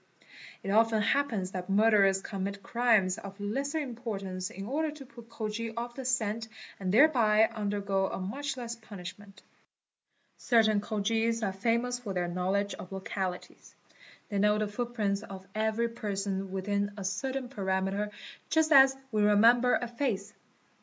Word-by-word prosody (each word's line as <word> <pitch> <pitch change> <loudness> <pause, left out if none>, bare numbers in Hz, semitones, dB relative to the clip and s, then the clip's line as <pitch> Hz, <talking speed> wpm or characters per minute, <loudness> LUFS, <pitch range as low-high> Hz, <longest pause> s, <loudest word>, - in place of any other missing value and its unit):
It 195 - -2
often 220 0 +3
i - - 0
eerpens 225 -9 0
that 185 0 -5
murderers 200 -2 +4
commit 200 0 -4
crimes 225 -5 +2
of 200 -1 -10
lesser 275 +9 -2
importance 210 -9 -4
in 195 +2 -7
order 305 +7 -1
to 295 -2 -9
put 235 -2 -14
Khojis 225 0 -4
off 240 +1 -4
the 265 +1 -7
scent 225 -3 0 0.3
and 185 -2 -1
thereby 225 -4 +5
undergo 200 -2 -1
a - - -4
much 265 +9 -4
less 235 -1 -5
punish 205 -4 -9
'ment 205 -1 -16 0.5
"), - - -45
Certain 220 -4 +3
Khojis 225 +2 0
are 195 -2 0
famous 235 +5 0
for 205 -6 -5
their 175 -1 0
knowledge 190 +3 -1
of 180 - -9
localities. 190 -1 -5 0.5
'They 200 -3 -1
know 210 +1 +4
the 215 0 0
footprints 210 -2 -2
of 190 -3 -9
every 220 +2 0
person 195 -3 -3
within 200 +1 -1
a 200 - -5
certain 255 +7 -2
perimeter 195 -2 -1 0.4
just 320 0 +2
'as 270 -2 +7
we 215 -2 +1
remember 230 +4 +5
a 240 - -2
face. 225 -5 -2
210 Hz, 155 wpm, -30 LUFS, 195-235 Hz, 0.5 s, as